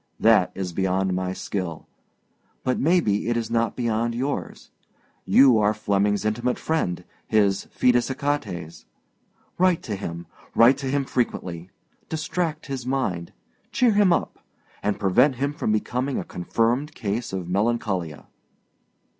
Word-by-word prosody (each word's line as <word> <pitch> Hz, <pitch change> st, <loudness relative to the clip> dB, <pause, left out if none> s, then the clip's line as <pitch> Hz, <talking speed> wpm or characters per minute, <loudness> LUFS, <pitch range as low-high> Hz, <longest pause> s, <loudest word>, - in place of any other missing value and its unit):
That 110 Hz, -5 st, +4 dB
is 90 Hz, -3 st, -4 dB
beyond 95 Hz, +1 st, 0 dB
my 90 Hz, 0 st, -1 dB
skill, 90 Hz, -3 st, -5 dB, 0.8 s
but 130 Hz, -, 0 dB
maybe 140 Hz, -, +2 dB
it 120 Hz, -, +1 dB
is 115 Hz, -1 st, -3 dB
not 115 Hz, -1 st, +1 dB
beyond 115 Hz, -1 st, -1 dB
yours. 135 Hz, +4 st, -4 dB, 0.5 s
You 130 Hz, -4 st, +6 dB
are 105 Hz, +1 st, +2 dB
Flemmingâs 105 Hz, 0 st, 0 dB
intimate 120 Hz, +4 st, 0 dB
friend, 90 Hz, -, -1 dB, 0.2 s
his 100 Hz, -3 st, +2 dB
fidus 125 Hz, 0 st, +2 dB
Achates. 105 Hz, -, -3 dB, 0.7 s
Write 185 Hz, -2 st, +3 dB
to 105 Hz, -, -3 dB
him, 85 Hz, -3 st, -6 dB, 0.3 s
write 125 Hz, +4 st, +6 dB
to 135 Hz, -, -4 dB
him 140 Hz, 0 st, 0 dB
frequently, 90 Hz, -9 st, -2 dB, 0.4 s
distract 160 Hz, +1 st, -2 dB
his 135 Hz, -3 st, -4 dB
mind, 120 Hz, -10 st, -2 dB, 0.4 s
cheer 245 Hz, -2 st, +3 dB
him 205 Hz, -3 st, +4 dB
up, -, -, 0 dB, 0.4 s
and 105 Hz, -1 st, -1 dB
prevent 125 Hz, +9 st, +3 dB
him 140 Hz, +3 st, -1 dB
from 125 Hz, -, -1 dB
becoming 125 Hz, +5 st, -1 dB
a -, -, -2 dB
confirmed 120 Hz, -, -1 dB
case 110 Hz, +2 st, -3 dB
of 95 Hz, -2 st, -4 dB
melancholia. 95 Hz, -5 st, -1 dB
115 Hz, 135 wpm, -24 LUFS, 95-135 Hz, 0.8 s, You